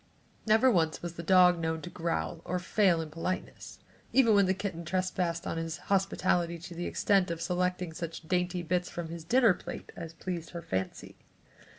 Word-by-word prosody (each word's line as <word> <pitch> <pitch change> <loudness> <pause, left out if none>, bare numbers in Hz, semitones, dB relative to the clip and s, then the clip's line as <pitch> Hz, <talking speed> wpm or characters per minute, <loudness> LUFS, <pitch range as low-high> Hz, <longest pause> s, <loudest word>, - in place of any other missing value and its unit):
Never 220 +4 +5
once 160 -6 +1
was 175 -1 -4
the 170 - -6
dog 180 0 +5
known 160 -1 -2
to 180 - -6
growl 80 - -2
or 180 - -2
fail 180 -1 +2
in 155 -1 -7
politeness, 165 +3 -5 0.3
even 245 -4 +5
when 200 -2 +5
the 190 - +3
kitten 190 -4 -4
trespassed 180 -1 -1
on - - -3
his 165 -1 -3 0.2
hospitality 180 -3 +1
to 175 +1 -9
the 175 +1 -4
extent 195 -3 +2
of 170 -1 -3
selecting 180 -1 -1
such 165 -1 -6
dainty 180 0 0
bits 180 +2 0
from 170 -2 -5
his 165 0 -7
dinner 230 +3 +5
plate - - -8
as 165 -1 -7
pleased 170 -1 -5
her 170 - -6
fancy. 95 -6 -4
175 Hz, 185 wpm, -30 LUFS, 165-185 Hz, 0.3 s, Never